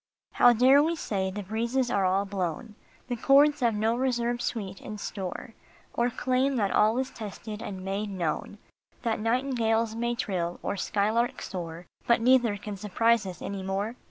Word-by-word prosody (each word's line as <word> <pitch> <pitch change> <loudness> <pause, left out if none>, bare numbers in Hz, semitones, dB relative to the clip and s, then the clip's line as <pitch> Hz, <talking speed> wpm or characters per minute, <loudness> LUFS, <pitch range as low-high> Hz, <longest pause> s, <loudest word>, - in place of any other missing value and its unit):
How 245 - +6
dare 255 +4 +6
we 325 +3 +1
say 195 -10 -2
the 205 +2 -5
breezes 235 +5 -1
all - - +2
are 190 +1 +2
blown, 195 +2 -3 0.3
The 245 - -2
chords 285 +4 +5
have 235 -3 +2
no 220 +2 +1
reserved 240 -1 0
sweet 195 -6 -4
in 215 - -7
store; 200 +3 -6 0.4
Or 240 +1 +1
claim 260 +3 0
that 205 -5 +1
all 215 +3 +3
is 260 +1 -1
tested 215 0 -7
and 190 -3 -6
made 200 +2 -2
known, 185 +1 -3 0.5
That 225 -2 0
nightingales 230 -1 +1
may 235 +1 -1
trill, 175 -6 -2
or - - -1
skylarks 215 +5 0
soar, 170 -2 -6 0.2
But 235 - +4
neither 240 -3 +4
can 205 0 -7
surprise 220 +2 +2
us 180 -3 -8
any 200 -1 -4
more 195 +4 -2
220 Hz, 170 wpm, -27 LUFS, 195-240 Hz, 0.5 s, How